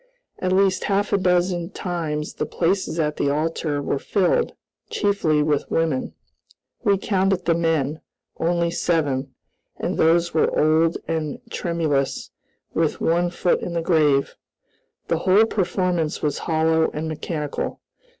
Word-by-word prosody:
At 185 - -1
least 190 0 +2
half 205 +1 0
a - - +5
dozen 180 -1 +1
times 155 -4 -3
the - - -3
places 175 -1 0
at 150 -1 0
the 140 - +1
altar 150 -1 -1
were 140 - -1
filled 205 - +1 0.4
chiefly 170 -8 +1
with 150 -1 0
women. 160 -5 -1 0.7
We 200 -4 +3
counted 190 -2 0
the 170 - +3
men, 160 -3 0 0.4
only 170 0 +1
seven, 145 -6 -1 0.4
and - - -3
those 170 +1 +3
were 160 - +2
old 160 +2 +3
and 155 -3 -2
tremulous, 155 -6 -1 0.4
with 160 -2 0
one 175 +2 +2
foot 175 0 +1
in 175 - -4
the 170 -1 -1
grave. 150 -5 +2 0.7
The 165 - 0
whole 195 +5 +5
performance 180 -6 -1
was 150 -2 0
hollow 160 0 +3
and 155 +1 -4
mechanical. 155 -1 -4
165 Hz, 135 wpm, -23 LUFS, 155-180 Hz, 0.7 s, a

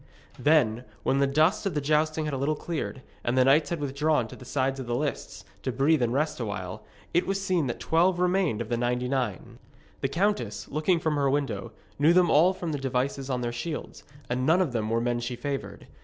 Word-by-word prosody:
Then, 125 -7 +3 0.2
when 135 - +2
the 140 - +3
dust 155 +8 +2
of 185 - -3
the - - +2
jousting 155 +2 +1
had 150 - -3
a - - -1
little 140 +3 0
cleared, 150 -4 -4 0.2
and 120 +2 0
the 130 - +5
knights 145 +3 +4
had 170 - -2
withdrawn 145 -2 +1
to - - -9
the 125 - -12
sides 135 0 -1
of 130 - -6
the 120 - -1
lists, 145 +2 -4 0.2
to 130 - -2
breathe 140 +4 +2
and 120 -1 +1
rest 150 +3 0
awhile, 100 -5 -5 0.3
it 175 - +2
was 195 0 0
seen 185 -7 0
that 120 - -4
twelve 175 +3 +2
remained 180 - +1
of - - -5
the 120 - 0
ninety 125 +1 0
nine. 125 -7 -3 0.4
The - - 0
countess, 135 - -1
looking 155 +4 +1
from 155 -2 0
her 140 -1 +2
window, 135 -9 -2 0.3
knew 155 +4 +5
them 180 -2 +4
all 165 +5 +6
from 180 -3 -4
the 145 - -2
devices 135 +1 -2
on 125 -2 -1
their 120 -1 -2
shields, 150 +7 -5 0.2
and 125 +1 -1
none 160 +7 +4
of 180 -8 +1
them 110 -3 -1
were 115 +1 +1
men 120 0 0
she 120 +1 -4
favoured. 135 +3 -5
140 Hz, 225 wpm, -27 LUFS, 125-160 Hz, 0.4 s, all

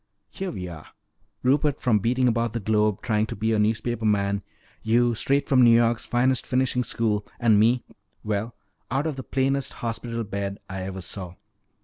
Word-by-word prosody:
Here 190 -1 -4
we 90 - -5
are, 80 -3 -9 0.6
Rupert 140 +2 +2
from 115 -5 +2
beating 125 +5 +1
about 115 -1 0
the 120 - -1
globe 105 -1 +1
trying 110 -1 +1
to - - -5
be 110 +2 0
a 110 - +2
newspaper 110 +2 0
man, 100 -2 +1 0.4
you 120 +2 +3
straight 140 +5 +1
from 130 -2 +5
N'York's 115 0 +4
finest 125 +1 +2
finishing 125 -1 +1
school, 110 -3 -1 0.2
and 110 -4 +4
me 120 +3 +3 0.4
well, 105 +2 -2 0.3
out 135 +4 0
of 155 -3 -2
the 130 - -5
plainest 135 +1 0
hospital 115 0 -4
bed 100 -1 -4
I 95 -1 -5
ever 95 0 -5
saw. 90 0 -7
115 Hz, 170 wpm, -25 LUFS, 105-125 Hz, 0.6 s, from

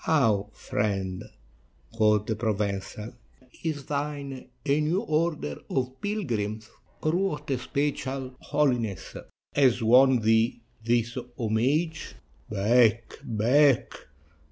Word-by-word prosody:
"How, 110 -10 +2
friend," 95 -3 -2 0.7
quoth 105 -2 +3
the 110 - -1
Provencal, 105 0 -3 0.5
"is 150 -4 -3
thine 140 -2 -4 0.2
a 145 +1 +2
new 165 +6 +1
order 155 - -1
of 130 0 -2
pilgrims, 110 - -3 0.3
or 155 - +2
what 160 -5 -1
especial 135 0 -2
holiness 125 -9 -1 0.4
has 130 -4 +3
won 125 +2 +6
thee 110 +2 +2 0.2
this 120 +1 +1 0.2
homage?" 135 +9 0 0.3
"Back, 115 +2 +2
back!" 125 +5 +3
125 Hz, 95 wpm, -27 LUFS, 110-145 Hz, 0.7 s, won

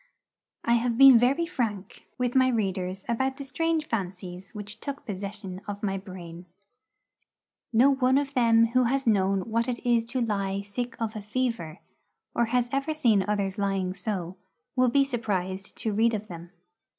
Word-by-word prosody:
I 235 - +3
have 235 -1 -1
been 270 -3 +9
very 270 +8 +2
frank 220 - -4
with 250 -1 0
my 260 -1 +5
readers 190 -5 -1
about 265 +3 0
the 280 - -6
strange 325 +3 -1
fancies 185 -4 -5
which 210 +1 -6
took 280 +2 -6
possession 195 -2 -6
of 205 0 -6
my 195 -2 0
brain. 180 -2 -10 1.2
No 245 +5 +5
one 260 -1 +3
of 285 0 -1
them 230 -3 +5
who 255 +1 +3
has 270 +3 0
known 195 -3 +2
what 230 +4 -1
it 245 -1 -1
is 235 -2 +3
to 245 +3 -3
lie 200 -3 -1
sick 240 +5 -5
of 225 -1 -3
a 215 - -4
fever, 210 -7 -3 0.5
or 235 - +2
has 245 +1 +1
ever 275 +3 -1
seen 225 -10 +3
others 200 -2 -1
lying 195 -2 0
so, 185 -2 -4 0.4
will 255 -1 +4
be 275 +3 +4
surprised 195 -7 -3
to 220 - -2
read 225 +2 +3
of 215 0 -6
them. 170 0 -9
225 Hz, 170 wpm, -27 LUFS, 195-250 Hz, 1.2 s, been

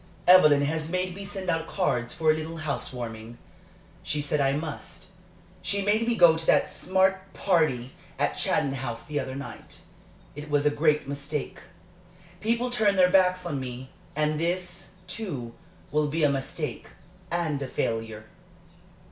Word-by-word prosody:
Evelyn 150 -6 +7
has 155 +2 -1
made 185 +1 -1
me 200 +2 -7
send 195 -1 -5
out 165 -1 0
cards 125 -11 0
for 160 -1 +2
a - - +3
little 160 +1 -5
house 155 -3 -3
warming. 115 -2 -7 0.6
She 150 - -2
said 145 0 0
I 135 -1 +3
must. 155 +1 -6 0.5
She 200 0 0
made 215 +3 +2
me 240 - +2
go 170 -5 +7
to 160 0 -4
that - - +3
smart 190 +1 +1
party 155 -9 +1 0.2
at - - +1
Chatton 135 - +1
House 120 -3 -5
the 150 -1 -2
other 130 -1 -4
night. 140 0 -9 0.5
It 150 +1 -8
was 145 0 +2
a 150 - +5
great 150 -1 +2
mistake. 140 +1 -4 0.8
People 235 +3 0
turned 210 -5 +2
their 180 -1 +5
backs 185 -1 +4
on 150 -5 -2
me. 130 0 -7 0.2
And 150 0 +1
this, 175 +1 -2 0.2
too, 180 - -5 0.4
will 150 0 +2
be 155 +2 -1
a 145 - +5
mistake 140 +3 -4 0.4
and 165 -5 -1
a 135 - -3
failure." 115 -3 -3
155 Hz, 160 wpm, -27 LUFS, 140-185 Hz, 0.8 s, Evelyn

